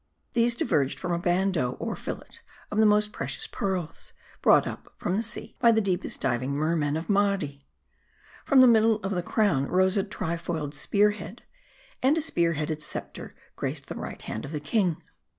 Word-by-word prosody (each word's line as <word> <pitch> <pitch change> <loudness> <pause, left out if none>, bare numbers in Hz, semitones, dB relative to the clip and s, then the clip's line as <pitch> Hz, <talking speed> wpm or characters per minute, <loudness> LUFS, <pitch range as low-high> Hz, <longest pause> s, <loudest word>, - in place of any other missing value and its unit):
These 235 0 +3
diverged 145 - 0
from 175 - -3
a 170 - 0
bandeau 175 -6 +1
or - - -4
fillet - - -7 0.3
of 210 - 0
the 220 - +6
most 210 0 +3
precious 135 +1 -4
pearls; 180 -5 -4 0.3
brought - - +5
up - - -7
from 180 - -1
the 215 - +1
sea 225 -1 -5
by 235 -1 +6
the 220 - +3
deepest 190 -4 -1
diving 130 +1 0
mermen 155 -1 0
of 160 - -5
Mardi. 195 -9 0 0.8
From 270 -2 +5
the - - +9
middle 225 -1 +5
of 195 - -2
the 180 -2 0
crown 175 - +1
rose 185 +2 +2
a 195 - +2
tri 190 -4 -3
foiled 160 -4 -4
spear 205 +7 +2
head. 210 +2 -9 0.6
And 275 +5 +3
a - - +1
spear 170 - +1
headed 155 0 -3
scepter 150 - -5 0.2
graced - - -4
the - - -5
right - - -7
hand 110 - -5
of 145 - -7
the 150 - -2
king. 175 +3 0
180 Hz, 185 wpm, -27 LUFS, 155-210 Hz, 0.8 s, the